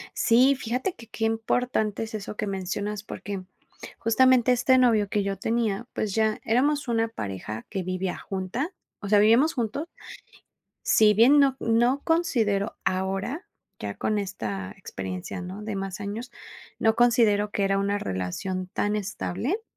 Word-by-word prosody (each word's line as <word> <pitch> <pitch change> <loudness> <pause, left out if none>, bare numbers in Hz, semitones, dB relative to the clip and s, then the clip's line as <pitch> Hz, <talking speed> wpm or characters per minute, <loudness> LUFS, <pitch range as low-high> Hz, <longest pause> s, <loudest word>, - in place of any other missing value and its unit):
Sí, 255 +4 +5
fíjate 255 +7 -2
que 230 - -14
qué 225 0 -3
importante 225 -1 0
es 220 - -10
eso 210 0 -5
que 210 - -2
mencionas, 200 +2 -3
porque 200 -2 -6 0.6
justamente 250 +1 +4
este 255 +1 +4
novio 225 -5 +4
que 205 +1 0
yo 195 0 -2
tenía, 225 0 -1
pues 205 -3 -2
ya 220 -1 +1
éramos 280 +5 +1
una 230 -1 +1
pareja 105 - -6
que 190 - -2
vivía 185 0 -3
junta, 195 - -4 0.3
o 200 - -6
sea, 205 0 +5
vivíamos 235 +10 +5
juntos. 250 +6 -2 1.0
Si 215 -1 +5
bien 245 +8 +6
no 275 -2 +4
no 240 +4 +2
considero 230 - +1
ahora, 195 - -2 0.3
ya - - -5
con 215 - 0
esta 105 - -4
experiencia, 95 - -6
¿no?, 185 +4 -7
de 210 -1 -4
más 195 -1 -4
años, 215 +5 -5 0.5
no 220 0 +3
considero 225 -4 +4
que 200 - 0
era 195 0 +2
una 200 +1 0
relación 180 - -3
tan 205 +1 0
estable 215 - -3
215 Hz, 150 wpm, -26 LUFS, 195-240 Hz, 1.0 s, bien